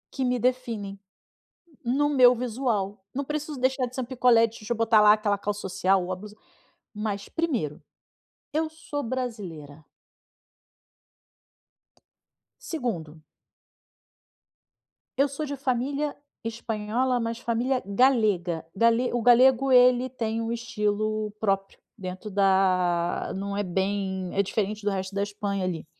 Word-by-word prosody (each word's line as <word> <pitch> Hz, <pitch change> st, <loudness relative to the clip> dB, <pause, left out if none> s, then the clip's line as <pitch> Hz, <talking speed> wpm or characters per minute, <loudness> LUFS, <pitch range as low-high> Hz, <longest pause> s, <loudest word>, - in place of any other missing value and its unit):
que 265 Hz, -, -1 dB
me 250 Hz, 0 st, +1 dB
definem, 230 Hz, -5 st, -2 dB, 0.9 s
no 280 Hz, +5 st, +2 dB
meu 250 Hz, -3 st, +6 dB
visual. 220 Hz, -5 st, -2 dB
Não 280 Hz, +1 st, -2 dB
preciso 300 Hz, -1 st, -4 dB
deixar 260 Hz, 0 st, +1 dB
de 245 Hz, -, -11 dB
ser 260 Hz, -, -3 dB
um -, -, -2 dB
picolé 245 Hz, -2 st, +4 dB
de 230 Hz, 0 st, -2 dB
chuchu, 225 Hz, +3 st, -3 dB
botar 225 Hz, -1 st, +4 dB
lá 210 Hz, 0 st, +8 dB
aquela 210 Hz, -2 st, +1 dB
calça 205 Hz, 0 st, -3 dB
social 190 Hz, 0 st, +1 dB
ou 185 Hz, -, -6 dB
a 185 Hz, -, -1 dB
blusa. 210 Hz, +2 st, -11 dB, 0.6 s
Mas, 205 Hz, -1 st, -4 dB
primeiro, 215 Hz, -, -2 dB, 0.7 s
eu 315 Hz, +1 st, 0 dB
sou 305 Hz, -2 st, -5 dB
brasileira. 195 Hz, -, -5 dB, 2.8 s
Segundo 170 Hz, -, -4 dB, 2.0 s
eu 280 Hz, +1 st, +4 dB
sou 280 Hz, +3 st, -4 dB
de 285 Hz, 0 st, -4 dB
família 275 Hz, +3 st, -1 dB, 0.3 s
espanhola, 230 Hz, +2 st, -1 dB
mas 230 Hz, 0 st, -2 dB
família 250 Hz, +2 st, 0 dB
galega. 200 Hz, -, +2 dB
Gale 230 Hz, +3 st, +3 dB
O 240 Hz, -, 0 dB
galego, 255 Hz, +2 st, +5 dB
ele 250 Hz, 0 st, +5 dB
tem 230 Hz, -2 st, -2 dB
um 225 Hz, 0 st, -2 dB
estilo 215 Hz, -2 st, -1 dB
próprio, 195 Hz, -2 st, -1 dB, 0.2 s
dentro 185 Hz, +2 st, -6 dB
da 185 Hz, -3 st, +2 dB
não 200 Hz, +1 st, -4 dB
é 205 Hz, -, 0 dB
bem 190 Hz, 0 st, -2 dB
é 200 Hz, -, +3 dB
diferente 210 Hz, +1 st, -2 dB
do 205 Hz, -, +1 dB
resto 190 Hz, 0 st, -3 dB
da 200 Hz, -, -1 dB
Espanha, 200 Hz, -1 st, -3 dB
ali. 170 Hz, -4 st, -3 dB
220 Hz, 130 wpm, -26 LUFS, 195-250 Hz, 2.8 s, lá